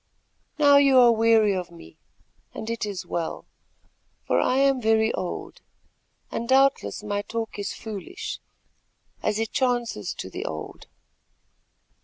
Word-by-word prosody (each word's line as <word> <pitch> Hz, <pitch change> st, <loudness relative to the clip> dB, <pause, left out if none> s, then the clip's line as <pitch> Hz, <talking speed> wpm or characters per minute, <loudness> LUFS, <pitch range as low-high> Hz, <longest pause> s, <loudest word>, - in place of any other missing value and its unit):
Now 285 Hz, -1 st, +6 dB
you 275 Hz, -2 st, +5 dB
are 245 Hz, -2 st, +7 dB
weary 225 Hz, -2 st, +4 dB
of 180 Hz, -1 st, -4 dB
me, 170 Hz, -, -15 dB, 0.6 s
and 220 Hz, +1 st, -5 dB
it 230 Hz, -2 st, -3 dB
is 195 Hz, -4 st, -5 dB
well; 170 Hz, -2 st, -4 dB, 0.8 s
for -, -, +2 dB
I 255 Hz, -, +2 dB
am 275 Hz, -1 st, +3 dB
very 220 Hz, 0 st, +2 dB
old, 180 Hz, -, -5 dB, 0.7 s
and 235 Hz, +1 st, -4 dB
doubtless 270 Hz, -4 st, +2 dB
my 205 Hz, -1 st, -2 dB
talk 225 Hz, 0 st, -5 dB
is 200 Hz, -, -4 dB
foolish, 210 Hz, -5 st, -6 dB, 0.8 s
as 210 Hz, 0 st, 0 dB
it 225 Hz, 0 st, -2 dB
chances 240 Hz, -, -1 dB
to -, -, -6 dB
the -, -, -5 dB
old. 80 Hz, -1 st, -7 dB
225 Hz, 135 wpm, -25 LUFS, 205-250 Hz, 0.8 s, are